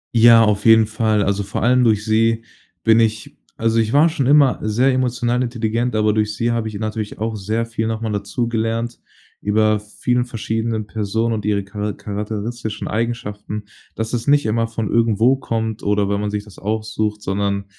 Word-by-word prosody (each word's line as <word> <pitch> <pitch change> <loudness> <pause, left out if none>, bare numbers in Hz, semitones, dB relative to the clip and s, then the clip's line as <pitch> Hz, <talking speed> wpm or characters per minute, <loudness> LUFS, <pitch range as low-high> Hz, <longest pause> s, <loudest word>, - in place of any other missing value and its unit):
Ja, 115 0 +7
auf 105 -1 +1
jeden 110 -1 +6
Fall. 110 -1 +1
Also 100 +1 0
vor 100 - -4
allem 125 +2 +4
durch 105 -3 +2
sie 115 +1 +2 0.4
bin 110 0 +5
ich 110 -1 -1 0.2
also 115 0 +2
ich 110 -1 +1
war 150 +5 +5
schon 145 -6 -1
immer 140 -2 +5
sehr 115 +5 +2
emotional 125 -1 0
intelligent, 120 -1 -1
aber 105 0 +2
durch 105 -1 0
sie 115 +3 0
habe 115 -1 -1
ich 110 - -6
natürlich 110 0 -4
auch 110 +1 -3
sehr 110 +3 -2
viel 110 -1 -3
noch 110 0 -3
mal 110 -1 -2
dazugelernt 115 +2 -2 0.4
über 110 +1 +2
vielen 120 +4 -1
verschiedenen 110 -1 -3
Personen 110 +2 -1
und 110 -2 -3
ihre 100 -1 0
chara 105 +1 -4
charakteristischen 105 +2 -5
Eigenschaften, 105 -2 -3 0.3
dass 110 +1 -4
es 120 +1 -2
nicht 145 0 +4
immer 115 +1 +1
von 115 -2 -3
irgendwo 115 +2 +3
kommt 110 -3 -3
oder 105 0 +1
wenn 100 0 -1
man 105 - -2
sich 105 0 -3
das 105 -2 -15
aussucht, 110 0 -2
sondern 100 0 -1
110 Hz, 180 wpm, -20 LUFS, 105-115 Hz, 0.4 s, Ja